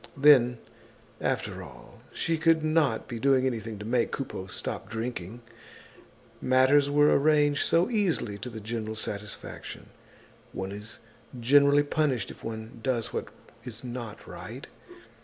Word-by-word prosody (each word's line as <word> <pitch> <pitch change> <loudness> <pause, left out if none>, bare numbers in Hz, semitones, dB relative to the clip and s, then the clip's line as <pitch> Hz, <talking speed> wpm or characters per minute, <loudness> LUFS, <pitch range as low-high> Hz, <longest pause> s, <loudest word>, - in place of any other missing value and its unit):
Then, 130 -4 +6 0.6
after - - -2
all, - - -13
she 165 - -1
could 160 -1 +4
not 155 -7 +2
be 120 -2 -5
doing 130 0 +3
anything 115 -4 -2
to 105 - -8
make 120 +1 +1
Coupeau 110 -8 -5
stop - - -5
drinking; 115 -1 -5 1.0
matters 130 +3 +4
were 145 +1 +5
arranged 145 0 +3
so 170 +2 +3
easily 180 - 0
to 125 - -6
the 110 -2 -7
general 110 0 -4
satisfaction. 105 -1 -6 0.6
One 95 0 -4
is 105 +2 -8 0.4
generally 140 +4 +5
punished 145 -7 0
if - - -14
one 110 0 -6
does 120 -2 -1
what - - -3 0.4
is 115 -2 -7
not 120 -3 -7
right. - - -8
125 Hz, 135 wpm, -28 LUFS, 110-145 Hz, 1.0 s, Then